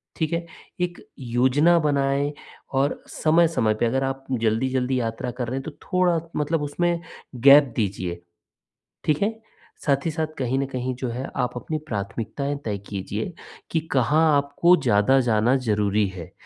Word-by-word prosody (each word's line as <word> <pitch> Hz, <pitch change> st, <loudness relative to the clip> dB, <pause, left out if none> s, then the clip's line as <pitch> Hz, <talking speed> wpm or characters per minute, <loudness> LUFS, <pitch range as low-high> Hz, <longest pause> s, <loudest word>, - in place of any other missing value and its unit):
ठीक 160 Hz, 0 st, -1 dB
है? 170 Hz, 0 st, -1 dB, 0.4 s
एक 175 Hz, 0 st, -1 dB, 0.2 s
योजना 130 Hz, +7 st, +3 dB
बनाएँ 140 Hz, -1 st, +1 dB, 0.4 s
और 135 Hz, +2 st, +1 dB
समय-समय 160 Hz, -9 st, +2 dB
पे, 110 Hz, -, 0 dB
अगर 135 Hz, +3 st, +1 dB
आप 135 Hz, 0 st, -3 dB, 0.2 s
जल्दी-जल्दी 125 Hz, +3 st, +1 dB
यात्रा 115 Hz, +1 st, -3 dB
कर 125 Hz, -1 st, -4 dB
रहे 130 Hz, -, -3 dB
हैं, -, -, -8 dB
तो 160 Hz, -, -6 dB
थोड़ा 180 Hz, -3 st, +2 dB, 0.2 s
मतलब 150 Hz, +1 st, 0 dB
उसमें 170 Hz, +4 st, 0 dB, 0.4 s
गैप 140 Hz, 0 st, +7 dB
दीजिए। 95 Hz, -5 st, -2 dB, 0.8 s
ठीक 150 Hz, +2 st, +1 dB
है? 220 Hz, +2 st, 0 dB, 0.5 s
साथ 140 Hz, 0 st, +1 dB
ही 165 Hz, -, +1 dB
साथ, 160 Hz, 0 st, -1 dB
कहीं 130 Hz, 0 st, 0 dB
न 140 Hz, -, 0 dB
कहीं 130 Hz, -1 st, -3 dB
जो 125 Hz, 0 st, -4 dB
है, 125 Hz, +3 st, -4 dB
आप 125 Hz, -2 st, 0 dB
अपनी 155 Hz, +6 st, -3 dB
प्राथमिकताएँ 115 Hz, +6 st, -3 dB
तय 105 Hz, -2 st, -1 dB
कीजिए 105 Hz, -, -4 dB, 0.4 s
कि 160 Hz, -, +2 dB
कहाँ 135 Hz, +4 st, +3 dB, 0.2 s
आपको 140 Hz, +5 st, +4 dB
ज़्यादा 120 Hz, +2 st, +4 dB
जाना 120 Hz, +1 st, +2 dB
ज़रूरी 105 Hz, 0 st, +2 dB
है। 90 Hz, -4 st, -9 dB
135 Hz, 155 wpm, -24 LUFS, 115-150 Hz, 0.8 s, गैप